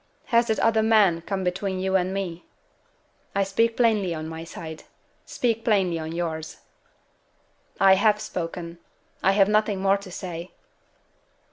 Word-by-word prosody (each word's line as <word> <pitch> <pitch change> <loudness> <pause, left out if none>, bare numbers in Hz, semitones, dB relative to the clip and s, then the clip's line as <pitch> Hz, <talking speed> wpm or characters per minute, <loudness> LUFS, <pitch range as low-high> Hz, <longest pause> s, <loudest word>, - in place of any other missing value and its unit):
"Has 235 -1 +3
that 220 - +1
other 220 -1 +3
man 210 -6 +4
come 190 +2 -3
between 185 +1 -2
you 190 0 0
and 185 0 +1
me? 185 -3 -4 0.9
I 200 - +3
speak 225 +4 +1
plainly 210 -7 +2
on 155 0 -5
my 160 0 -7
side. 160 -1 -9 0.4
Speak 230 -2 -1
plainly 190 -6 +2
on 160 0 -5
yours." 160 -2 -4 1.2
"I 195 -1 +7
have 210 +2 +3
spoken. 170 -2 -5 0.4
I 195 - +3
have 195 -1 +4
nothing 210 -1 +1
more 195 +1 +3
to 200 -1 -11
say." 175 -1 -7
190 Hz, 145 wpm, -25 LUFS, 170-210 Hz, 1.2 s, I